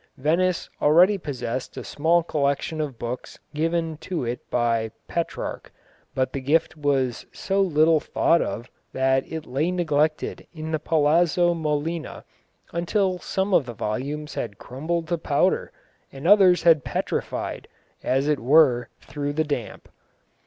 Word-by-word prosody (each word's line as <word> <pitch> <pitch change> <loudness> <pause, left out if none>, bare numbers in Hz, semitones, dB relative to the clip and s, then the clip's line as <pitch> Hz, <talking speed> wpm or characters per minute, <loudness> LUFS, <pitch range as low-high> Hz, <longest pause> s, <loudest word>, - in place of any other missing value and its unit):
Venice 170 +6 +1
already 180 +7 +5
possessed 130 -5 -5
a - - -5
small 165 +3 +2
collection 150 +1 -1
of 140 -5 -4
books 120 +2 -6 0.2
given 165 +1 -1
to 170 -4 -4
it 120 +1 -3
by 115 -2 +1 0.2
Petrarch, 170 -1 -4 0.4
but 130 -1 0
the 135 - -3
gift 155 +6 +1
was 135 -5 0
so 195 0 -1
little 160 -3 +4
thought 165 +2 +2
of 120 +3 -4 0.3
that 130 0 +1
it 160 -1 -5
lay 140 +7 -1
neglected 155 -4 0
in 160 0 -5
the 155 - 0
Palazzo 165 +3 +3
Molina 160 0 -3 0.5
until 180 +2 0
some 190 +2 -2
of 140 -7 +4
the 120 - -6
volumes 145 +9 -3
had 100 -4 -4
crumbled 160 +6 -3
to 170 -2 0
powder, 160 +4 +1 0.4
and 135 +4 -5
others 190 -3 +6
had 160 -5 +5
petrified, - - -3 0.3
as 135 +2 +1
it 150 -2 +2
were, 125 -2 +4
through 145 -1 -4
the 155 +2 +1
damp. 145 -7 -5
155 Hz, 140 wpm, -24 LUFS, 135-170 Hz, 0.5 s, others